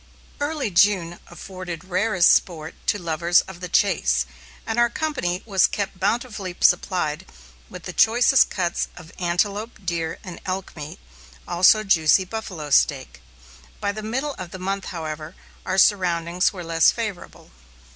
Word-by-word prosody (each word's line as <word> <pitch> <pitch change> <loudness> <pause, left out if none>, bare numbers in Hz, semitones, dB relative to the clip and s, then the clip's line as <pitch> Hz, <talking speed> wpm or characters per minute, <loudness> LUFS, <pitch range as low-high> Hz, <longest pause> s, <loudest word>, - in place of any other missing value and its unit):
Early 290 -6 -2
June 175 -2 +2
afforded 185 -3 -8
rarest 185 0 +3
sport 160 -3 -1
to - - +2
lovers 170 -1 +2
of 190 -2 -11
the 180 -1 -6
chase, 200 +3 +2 0.4
and 225 +1 -1
our 240 0 +4
company 245 - -2
was 195 -5 +3
kept 200 -2 -4
bountifully 205 -2 -2
supplied 175 -4 +2 0.5
with - - -8
choicest 240 +3 +5
cuts 175 -3 -1
of 170 -1 -12
antelope, 200 +6 -1
deer, 165 -2 -2
and 180 -2 -9
elk 190 0 -4
meat, 150 -2 -8 0.5
also 185 +5 +5
juicy 185 -1 +4
buffalo 180 -8 -6
steak. 135 -2 +1 0.6
By 200 - -1
the 215 +1 -7
middle 265 +7 -3
of 185 -2 -6
the 185 - -8
month, 195 +1 -3
however, 155 -2 -6 0.3
our 185 - -1
surroundings 180 -3 +2
were 185 -4 -8
less 165 -1 +4
favorable. 215 - -5
185 Hz, 140 wpm, -23 LUFS, 170-210 Hz, 0.6 s, choicest